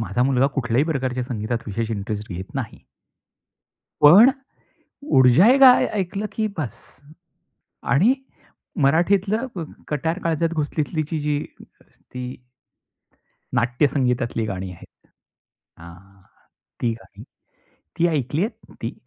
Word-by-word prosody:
माझा 120 +2 -1
मुलगा 135 0 +3
कुठल्याही 120 +3 +1
प्रकारच्या 130 -4 -2
संगीतात 115 -1 -2
विशेष 115 +2 -3
इंटरेस्ट 105 0 -4
घेत 95 +2 -8
नाही. - - -5 1.2
पण 195 - +9 0.9
ऊर्जा 130 - +6
ए 275 - +3
काय 260 -2 +7
ऐकलं 195 +3 -3
की 220 -1 -1
बस्स. 130 -7 -6 0.9
आणि 200 - +3 0.7
मराठीतलं 195 - +2
व् 175 - -4
व - - -3 0.2
कट्यार 160 +5 -2
काळजात 165 0 0
घुसलीतली 155 0 -2 0.2
जी, 150 0 -1 0.4
ती 125 0 -9 1.2
नाट्यसंगीतातली 125 -2 0
गाणी 95 -2 -5
आहेत, 85 - -13 0.9
अ - - -14
हां, 95 +3 -15 0.6
ती 120 - +1
गाणी - - -15 0.8
ती 170 - +4
ऐकली 145 -1 -1
आहेत 225 0 -9
ती? 115 - -3
135 Hz, 115 wpm, -22 LUFS, 115-165 Hz, 1.2 s, पण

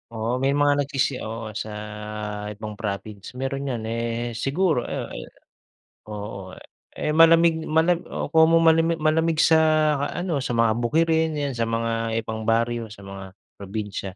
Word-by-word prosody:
Oo, 115 +1 -2
may 135 - +3
mga 145 0 +3
nagsisi 135 -2 -1
oo, 110 -1 -6
sa 110 - -4 0.8
ibang 105 0 -7
province. 100 -1 -6
Meron 135 +1 -2
yan 115 -3 -4
eh, 115 +1 -3
siguro 145 +2 +1
oo - - -4
e - - -7 0.8
oo. 100 -3 -7 0.4
Eh, 150 - -1
malamig 165 +1 +5
mala 165 +2 +3
oo - - -6
komo 160 0 +5
malami 165 +1 +4
malamig 160 +1 +1
sa 160 -1 +5 0.6
ano, 175 -4 -1
sa 125 -2 -2
mga 115 -1 +3
bukirin, 160 +5 +1
yan 145 -2 -1
sa 115 - +1
mga 115 0 -1
ibang 110 0 -5
baryo, 115 0 +1
sa 105 -2 -13
mga 95 0 -8 0.4
probinsya. 100 -1 -5
120 Hz, 150 wpm, -24 LUFS, 110-160 Hz, 0.8 s, malamig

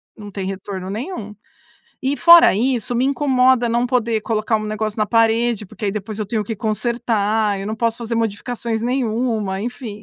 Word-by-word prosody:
Não 205 -2 -10
tem 195 -1 -5
retorno 190 -1 -5
nenhum 215 - -6 0.7
e 275 +2 +1
fora 340 +2 +8
isso, 245 +2 0
me 245 - +2
incomoda 260 -3 +3
não 235 +1 +1
poder 235 -3 0
colocar 220 0 0
um 215 - -4
negócio 215 0 -3
na 215 - +1
parede, 230 0 +2
porque 210 - -9
aí 200 - 0
depois 215 +1 -6
eu 215 - -3
tenho 215 +1 -1
que 220 +2 -5
consertar. 220 -2 0
Eu 195 - -5
não 220 +1 -3
posso 230 0 -1
fazer 235 -1 -4
modificações 225 +1 -2
nenhuma. 230 -5 -1
Enfim, 225 -2 -6
225 Hz, 180 wpm, -20 LUFS, 210-240 Hz, 0.7 s, fora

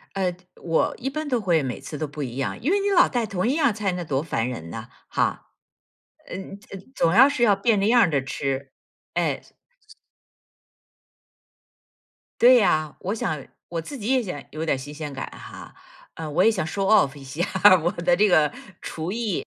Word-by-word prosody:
呃， 185 -2 0 0.3
我 165 -1 +1
一 265 - -3
般 305 +2 -4
都 245 -5 0
会 170 -5 +2
每 130 -3 -4
次 150 - -7
都 155 0 -3
不 145 0 -6
一 125 -1 -6
样， 135 - -2
因 290 +10 0
为 405 - +3
你 405 0 0
老 360 -3 +6
带 240 -3 -1
同 195 -3 -2
一 250 - +2
样 285 -9 +2
菜， 205 -2 -1
那 180 0 -4
多 140 -3 -1
烦 120 -7 -1
人 85 -10 -7
呢， - - -7 0.2
哈。 - - 0 0.9
呃 - - -7 0.3
呃 195 - -8 0.2
总 165 - +2
要 260 +5 +8
是 285 -4 -2
要 210 -4 +5
变 210 +1 +2
着 200 - +1
样 230 -5 +5
着 140 -3 +1
吃， 135 0 -3 0.4
哎。 - - 0 3.0
对 250 +1 +8
呀， 155 -8 +1
我 195 +4 -3
想 155 - -3 0.2
我 170 - -3
自 280 - -8
己 215 -3 -6
也 260 0 +3
想 180 - -6
有 155 +2 -4
点 155 - +1
儿 - - -5
新 140 +3 -8
鲜 150 -1 -6
感 135 - -4
哈， - - -11 0.4
呃 160 -1 -6
我 150 - +2
也 225 - +6
想 190 -8 -2
Show 195 +5 -3
Of 195 -9 +4
一 140 - -11
下 145 +6 -3 0.4
我 175 - +2
的 175 -2 +1
这 210 +4 +4
个 155 -6 +4 0.3
厨 160 +2 -5
艺。 220 -4 -2
175 Hz, 225 characters per minute, -24 LUFS, 150-225 Hz, 3.0 s, 要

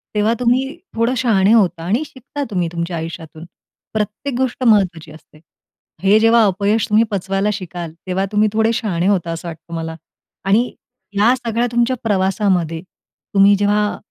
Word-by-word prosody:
तेव्हा 210 +2 +2
तुम्ही 260 +5 +1 0.2
थोडं 230 +2 +1
शहाणे 220 -4 +3
होता, 175 -7 +2
आणि 220 - 0
शिकता 280 +2 -7
तुम्ही 180 -3 0
तुमच्या 170 0 -3
आयुष्यातून. 160 0 -7 0.5
प्रत्येक 220 +5 -3
गोष्ट 260 0 -1
महत्त्वाची 185 -9 +2
असते. 155 0 -17 0.6
हे 205 +3 +5
जेव्हा 225 0 +5
अपयश 200 +3 +1
तुम्ही 215 +2 +4
पचवायला 195 +1 -1
शिकाल, 175 -4 -6
तेव्हा 190 +1 0
तुम्ही 210 0 +3
थोडे 220 +1 +2
शहाणे 190 -6 -1
होता, 175 -4 +1
असं 165 +1 -6
वाटतं 165 +1 -9
मला. 160 0 -4 0.5
आणि 220 +5 +2 0.5
या 235 +4 +5
सगळ्या 240 -1 -1
तुमच्या 240 +2 +1
प्रवासामध्ये, 190 -5 0 0.5
तुम्ही 200 +1 +6
जेव्हा, 205 +1 +1
205 Hz, 150 wpm, -18 LUFS, 175-230 Hz, 0.6 s, तुम्ही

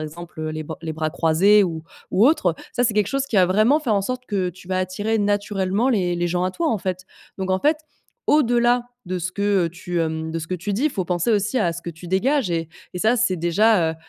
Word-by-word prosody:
exemple, 160 +2 -8
heu, 155 0 -3
les 155 0 -4
ba 160 +1 -7
les 160 -1 -4
bras 155 0 -2
croisés 175 +6 +4
ou 165 -3 -4 0.3
ou 205 - +4
autre, 190 - +2 0.2
ça, 245 - +1
c'est 220 - +1
quelque 210 -2 +2
chose 275 +2 -1
qui 260 - -7
va 185 - +6
vraiment 215 - +3
faire 245 -8 0
en 200 - +2
sorte 255 +5 -3
que 190 -3 -1
tu 180 +1 -16
vas 185 0 0
attirer 205 +4 -1
naturellement 205 +1 0
les 185 -8 +1
les 175 0 -1
gens 175 +1 0
à 185 - 0
toi, 335 - -1
en 220 - 0
fait, 185 -1 -4 0.3
donc 190 -1 -2
en 185 - +2
fait, 300 +7 +2 0.5
au-delà 245 -3 +3 0.2
de 185 0 -2
ce 180 +1 -4
que, 200 -2 +1
heu, - - -2
tu, 175 +1 -4
hem 160 0 -2
de 165 - -3
ce 160 - -6
que 185 - -3
tu 180 +4 -4
dis, 255 +10 +1
faut 195 -10 -3
penser 175 +4 0
aussi 215 +4 +1
à 175 -7 +1
ce 170 - -8
que 170 - -5
tu 165 +2 -12
dégages 225 - +1
et 165 -1 -2 0.3
et - - -3
ça, 220 +6 +3
c'est 220 -6 +1
déjà, 175 +1 +3
heu, - - -10
185 Hz, 260 wpm, -22 LUFS, 175-220 Hz, 0.5 s, va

